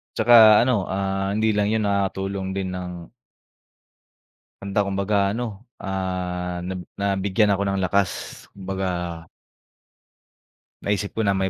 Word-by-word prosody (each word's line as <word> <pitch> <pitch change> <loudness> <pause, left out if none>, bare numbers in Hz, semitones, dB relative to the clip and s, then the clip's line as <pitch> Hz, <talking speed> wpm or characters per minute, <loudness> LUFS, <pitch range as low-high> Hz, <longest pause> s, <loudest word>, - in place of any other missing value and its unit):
Tsaka 110 -2 +7
ano, 120 -6 +1
ah, 95 0 -1
hindi 110 +1 +2
lang 105 -1 +1
yun. 110 -1 +1
Nakakatulong 95 -1 -1
din 95 -1 -2
ng 90 -2 -7 1.5
Kanta. 100 +1 -2
Kumbaga 100 +1 -1 0.2
ano, 115 +4 -2 0.4
ah, 90 -2 -3
nab 95 0 -4 0.2
nabigyan 100 +1 +2
ako 100 - -1
ng 100 - -1
lakas, 100 -1 +2 0.4
kumbaga 95 0 -4 2.0
Naisip 100 0 -1
ko 110 - +1
na 100 - +3
may 95 0 0
100 Hz, 120 wpm, -23 LUFS, 95-100 Hz, 2.0 s, Tsaka